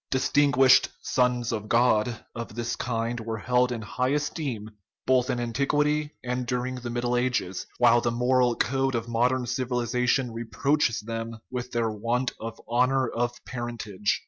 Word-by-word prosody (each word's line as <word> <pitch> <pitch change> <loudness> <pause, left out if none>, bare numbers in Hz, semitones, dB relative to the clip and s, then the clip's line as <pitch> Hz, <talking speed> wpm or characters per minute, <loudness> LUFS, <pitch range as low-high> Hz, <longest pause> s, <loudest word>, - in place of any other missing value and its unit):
Distinguished 135 -1 +4
" - - -37
sons 125 -2 +2
of 105 -2 -4
God 115 -1 +2
" - - -49
of 115 -2 -6
this 120 0 -2
kind 115 0 -2
were 115 0 -4
held 125 +3 +2
in 115 -3 -4
high 125 +4 -1
esteem 140 -6 -2 0.3
both 130 0 +3
in 125 -2 0
antiquity 150 +5 0
and 125 0 -2
during 125 +1 -1
the 120 -1 -6
Middle 120 +1 -1
Ages, 120 -7 -1
while 120 -1 +5
the 120 - +1
moral 125 +1 +2
code 135 +1 0
of 115 0 -2
modern 125 +2 +1
civilization 125 0 0
re 115 +1 -4
proaches 115 +1 +1
them 115 +1 -5
with 125 -1 -4
their 115 -2 0
want 120 +4 -1
of 115 0 -6
honorable 125 0 +1 0.2
parentage. 110 -5 -2
120 Hz, 160 wpm, -26 LUFS, 115-130 Hz, 0.3 s, while